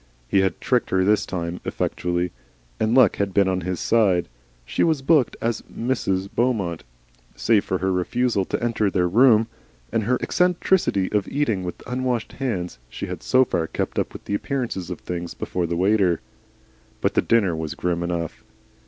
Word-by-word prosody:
He 95 Hz, -, +3 dB
had 95 Hz, -2 st, +1 dB
tricked 125 Hz, -2 st, +1 dB
her 95 Hz, 0 st, +2 dB
this 105 Hz, +2 st, +2 dB
time, 85 Hz, -1 st, -3 dB
effectually, 90 Hz, 0 st, -1 dB, 0.5 s
and 110 Hz, +2 st, +2 dB
luck 125 Hz, -7 st, +5 dB
had 100 Hz, -2 st, -1 dB
been 100 Hz, -1 st, +4 dB
on 95 Hz, -1 st, 0 dB
his 90 Hz, +1 st, -3 dB
side. 95 Hz, -7 st, +2 dB, 0.4 s
She -, -, 0 dB
was 155 Hz, -5 st, +1 dB
booked 145 Hz, -3 st, +3 dB
as 115 Hz, -1 st, -1 dB
Mrs. 100 Hz, -6 st, -1 dB
Beaumont. 105 Hz, -9 st, 0 dB, 0.5 s
Save 100 Hz, -, +2 dB
for 95 Hz, -, 0 dB
her 95 Hz, +2 st, 0 dB
refusal 100 Hz, +4 st, +1 dB
to -, -, -3 dB
enter 110 Hz, -3 st, +1 dB
their 90 Hz, -2 st, +1 dB
room, 115 Hz, +3 st, +5 dB, 0.5 s
and 110 Hz, -2 st, 0 dB
her 125 Hz, +3 st, +2 dB
eccentricity 180 Hz, -, +1 dB
of 105 Hz, -2 st, 0 dB
eating 115 Hz, -10 st, 0 dB
with 90 Hz, -, -6 dB
unwashed 125 Hz, -2 st, -2 dB
hands, 90 Hz, -, -3 dB
she -, -, -5 dB
had -, -, -6 dB
so 130 Hz, 0 st, +4 dB
far 85 Hz, -7 st, -1 dB
kept -, -, -2 dB
up -, -, -3 dB
the -, -, -3 dB
appearances 115 Hz, -6 st, -2 dB
of 90 Hz, -, -5 dB
things 85 Hz, -1 st, -5 dB
before 90 Hz, -2 st, -2 dB
the 85 Hz, 0 st, -2 dB
waiter. 95 Hz, -2 st, +3 dB, 0.8 s
But -, -, +1 dB
the -, -, +3 dB
dinner 100 Hz, -7 st, +2 dB
was 80 Hz, -1 st, -4 dB
grim 85 Hz, -1 st, -1 dB
enough. 85 Hz, -2 st, -3 dB
100 Hz, 175 wpm, -23 LUFS, 90-120 Hz, 0.8 s, luck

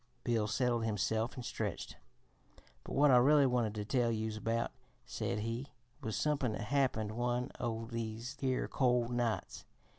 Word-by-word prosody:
Bill 115 Hz, -3 st, +1 dB
settled 120 Hz, +1 st, +1 dB
himself 110 Hz, +2 st, 0 dB
and 125 Hz, -, -6 dB
stretched. -, -, -3 dB, 0.9 s
"But -, -, -7 dB
what 145 Hz, 0 st, +6 dB
I 125 Hz, -, +8 dB
really 140 Hz, +3 st, +6 dB
wanted 120 Hz, -4 st, +1 dB
to 105 Hz, -1 st, -3 dB
tell 120 Hz, 0 st, +2 dB
youse 110 Hz, -1 st, -2 dB
about," 115 Hz, +2 st, -1 dB, 0.3 s
said 105 Hz, -, -2 dB
he, 115 Hz, +5 st, -3 dB, 0.3 s
"was 110 Hz, -2 st, -3 dB
somepin' 140 Hz, -2 st, +1 dB
that -, -, -4 dB
happened 115 Hz, -3 st, +1 dB
one 120 Hz, +3 st, -1 dB
o' 115 Hz, -2 st, -2 dB
these 115 Hz, +2 st, -4 dB
here 130 Hz, -2 st, 0 dB
cold 125 Hz, -2 st, +2 dB
nights. 120 Hz, -2 st, -1 dB
120 Hz, 155 wpm, -34 LUFS, 110-125 Hz, 0.9 s, I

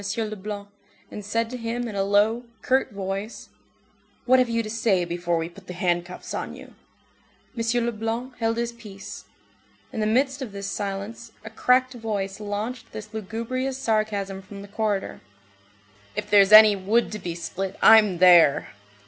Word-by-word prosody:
Leblanc, 210 Hz, -2 st, -4 dB, 0.4 s
and 210 Hz, -, -7 dB
said 230 Hz, +3 st, -1 dB
to 250 Hz, +2 st, -6 dB
him 235 Hz, +1 st, -3 dB
in 220 Hz, -, -6 dB
a 200 Hz, -, -1 dB
low, 205 Hz, +4 st, +2 dB, 0.2 s
curt 260 Hz, 0 st, +1 dB
voice:— 195 Hz, +2 st, -5 dB, 0.8 s
"What 255 Hz, +1 st, +5 dB
have 250 Hz, -1 st, +2 dB
you 230 Hz, 0 st, 0 dB
to 215 Hz, -, -6 dB
say 215 Hz, -5 st, +1 dB
before 175 Hz, 0 st, -1 dB
we 165 Hz, 0 st, -2 dB
put 185 Hz, +2 st, -15 dB
the 180 Hz, -, -6 dB
handcuffs 175 Hz, 0 st, -2 dB
on -, -, -4 dB
you?" -, -, -13 dB, 0.8 s
M. 230 Hz, 0 st, 0 dB
Leblanc 235 Hz, +2 st, -3 dB
held 225 Hz, 0 st, 0 dB
his 235 Hz, 0 st, -1 dB
peace. 210 Hz, -5 st, -10 dB, 0.7 s
In -, -, -4 dB
the 215 Hz, -, +1 dB
midst 270 Hz, +5 st, +1 dB
of 235 Hz, -6 st, -6 dB
this 200 Hz, 0 st, -6 dB
silence, 200 Hz, +3 st, -5 dB
a 220 Hz, -, -8 dB
cracked 255 Hz, +3 st, +2 dB
voice 205 Hz, -4 st, -4 dB
launched 215 Hz, +3 st, -5 dB
this 215 Hz, 0 st, -8 dB
lugubrious 230 Hz, +5 st, -3 dB
sarcasm 215 Hz, -5 st, -1 dB
from 200 Hz, +1 st, -10 dB
the -, -, -11 dB
corridor:— 205 Hz, -1 st, -2 dB, 0.9 s
"If -, -, -5 dB
there's 200 Hz, -1 st, +6 dB
any 215 Hz, -1 st, +9 dB
wood 205 Hz, +5 st, +1 dB
to 215 Hz, -, -5 dB
be 175 Hz, -3 st, -5 dB
split, 185 Hz, +2 st, -5 dB
I'm 210 Hz, -5 st, +7 dB
there!" 175 Hz, -5 st, +6 dB
215 Hz, 165 wpm, -24 LUFS, 195-230 Hz, 0.9 s, any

